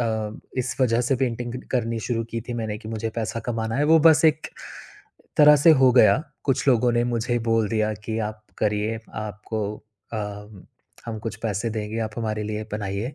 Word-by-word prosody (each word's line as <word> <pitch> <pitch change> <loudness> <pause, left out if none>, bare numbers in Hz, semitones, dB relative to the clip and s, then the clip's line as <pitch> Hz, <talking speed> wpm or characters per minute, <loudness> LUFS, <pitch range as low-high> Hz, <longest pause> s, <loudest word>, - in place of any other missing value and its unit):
अ, 110 -2 -2 0.2
इस 125 0 -2
वजह 120 -2 +3
से 125 +2 +1
पेंटिंग 120 -1 -2
क 125 - -7
करनी 115 -2 0
शुरू 115 0 -2
की 115 - -3
थी - - -2
मैंने 110 -2 -3
कि 110 - -10
मुझे 110 0 -3
पैसा 115 0 -2
कमाना 115 -1 -2
है, 145 - +2
वो 160 +1 +6
बस 160 +1 +5
एक 155 0 +3 0.9
तरह 150 0 +8
से 155 +4 +6
हो 130 - +7
गया। 110 -5 +6 0.3
कुछ 135 0 0
लोगों 120 -1 +4
ने 120 0 +2
मुझे 120 0 0
बोल 115 -2 +2
दिया 110 -1 0
कि 110 0 -2
आप 110 0 -16
करिए 105 +1 0 0.2
आपको 105 0 -4 0.5
अ, - - -2 0.9
हम 110 -2 -4
कुछ 110 -1 -4
पैसे 110 +1 -1
देंगे 110 +1 -4
आप 110 0 -4
हमारे 110 -1 -2
लिए 105 0 -4
बनाइए। 105 +4 -3
115 Hz, 190 wpm, -24 LUFS, 110-120 Hz, 0.9 s, तरह